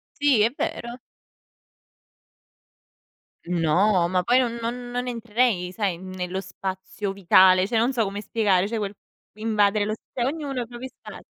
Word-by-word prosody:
Sì, 285 -6 +3
è 235 +3 +1
vero. 240 +1 -4 2.5
No, 175 +2 +2
ma 185 -1 +2
poi 245 +6 +3
non 240 -2 +1
non 245 +1 -5
non 245 +1 -2
entrerei 230 -5 0
sai, 195 -3 -1
nello 185 0 -5
spazio 190 +1 -5
vitale, 185 0 +5
cioè 230 0 0
non 240 +4 +2
so 230 -3 +1
come 200 0 -4
spiegare, 200 -3 +1
cioè 230 +1 -3
quel 205 -1 -3 0.4
invadere 215 -1 +2
lo 215 - -1
s - - -6 0.2
cioè, 240 - -1
ognuno 275 -2 -3
i 230 - -12
propri 245 +2 -8
spazi. - - -12
215 Hz, 155 wpm, -24 LUFS, 190-240 Hz, 2.5 s, vitale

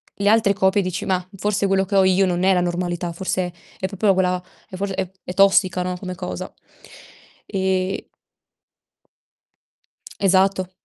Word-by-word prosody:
le 200 0 +1
altre 215 -2 +4
coppie 195 +1 +2
dici: 185 -1 -3
"Mah, 185 -2 0
forse 205 +1 0
quello 195 0 +2
che 200 +2 -3
ho 195 - +6
io 190 +1 +4
non 180 0 -1
è 190 - +5
la 180 - +2
normalità, 175 0 -2
forse 185 0 -2 0.3
è 190 - -1
proprio 195 +1 +2
quella 180 -1 +1 0.3
è - - -8
forse 195 +1 -3
è 190 -2 -2
è 180 - -6
tossica, 190 -2 +4
no, 180 0 -2
come 185 -1 -6
cosa." 90 - -6 0.9
Ehm 190 0 -1 2.2
Esatto. 190 -1 +2
190 Hz, 155 wpm, -21 LUFS, 180-195 Hz, 2.2 s, ho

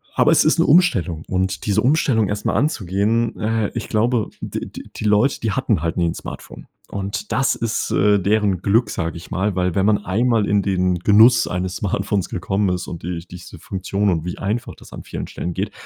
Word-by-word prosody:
Aber, - - +4
es - - +5
ist - - +2
'ne - - +4
Umstellung 95 - +3
und 95 0 -2
diese 105 +1 +2
Umstellung 125 -5 +2
erst 105 +1 -4
mal - - +1
anzugehen, 110 - 0
äh, 110 -1 0
ich 115 - -4
glaube, 115 0 +1
d - - -4
d - - -9
die 110 - -5
Leute, 105 +6 +3
die 110 - -1
hatten 110 - 0
halt 85 0 -2
nie 85 -1 +2
'n 80 - -2
Smartphone. - - -9 0.2
Und, 100 0 -5
das 130 +4 +2
ist, 115 -1 -2
äh, 105 +1 +3
deren 100 -1 +1
Glück, 110 +2 +2
sage 85 -4 -3
ich 85 +1 -10
mal, 95 +1 -1
weil 90 -2 0
wenn 95 - +2
man 105 -1 +2
einmal 115 +2 +1
in 100 0 +2
den 90 -2 +1
Genuss 110 +7 +5
eines 90 +1 -3
Smartphones 100 -1 -1
gekommen 95 0 -1
ist 90 -1 -3
und 85 -3 -7
die 85 -1 -5
diese 90 0 -11
Funktion 100 +3 -2
und 85 -3 -1
wie 90 - -5
einfach 105 +5 -3
das - - -16
an - - -9
vielen - - -6
Stellen 90 - -5
geht, - - -3
100 Hz, 210 wpm, -20 LUFS, 90-110 Hz, 0.2 s, es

